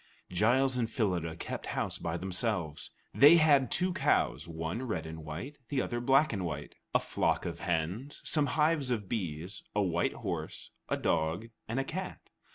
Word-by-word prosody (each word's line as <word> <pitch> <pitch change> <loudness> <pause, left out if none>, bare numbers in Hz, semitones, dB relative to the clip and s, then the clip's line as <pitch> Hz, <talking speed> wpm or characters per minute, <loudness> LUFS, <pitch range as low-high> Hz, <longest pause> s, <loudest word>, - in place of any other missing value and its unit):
Giles 125 +8 +3
and 120 -3 0
Phyllida 90 -8 0
kept - - -5
house - - -1
by 85 0 -2
themselves. 90 -4 -1 0.2
They 145 +5 +9
had 145 -5 +5
two 185 0 +1
cows, 75 - +1
one 80 +6 -3
red 105 -11 -2
and 80 0 -7
white, 85 - -6
the 140 - 0
other 120 -1 -1
black 135 +3 +4
and 95 -3 -2
white, 75 -4 -4 0.2
a - - +7
flock - - 0
of - - -4
hens, 90 - -2
some 150 -3 +2
hives 150 -3 +3
of 110 -5 -1
bees, 90 -3 -3
a 105 - +3
white 85 -2 +1
horse, - - -4 0.2
a - - +1
dog, 85 +8 0 0.2
and 115 +4 -1
a - - +1
cat. 185 +7 -6
105 Hz, 170 wpm, -31 LUFS, 85-135 Hz, 0.2 s, They